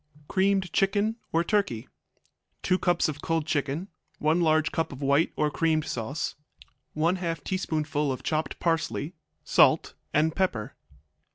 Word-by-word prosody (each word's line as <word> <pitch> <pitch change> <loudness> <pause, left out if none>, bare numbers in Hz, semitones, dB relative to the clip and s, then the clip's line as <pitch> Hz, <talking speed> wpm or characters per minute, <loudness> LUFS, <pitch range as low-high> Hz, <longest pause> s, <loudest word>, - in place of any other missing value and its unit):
Creamed 190 -1 +1
Chicken 205 +3 +2
or 165 +1 +2
Turkey 170 - 0 0.8
2 185 - +2
cups 175 -1 +2
of 150 -1 -5
cold 165 -2 0
chicken. 145 +3 -1 0.3
1 155 +3 +2
large 155 -1 +3
cup 165 - -1
of 140 0 -7
white 140 +4 +3
or 150 -1 +1
creamed 160 -1 +1
sauce. 125 +6 -3 0.6
1/2 165 -1 0
teaspoonful 155 -6 -1
of 130 - -5
chopped 155 0 -2
parsley. 165 -1 -1 0.3
Salt - - +4 0.2
and 155 +2 +2
pepper. 125 - -1
160 Hz, 130 wpm, -27 LUFS, 150-180 Hz, 0.8 s, Salt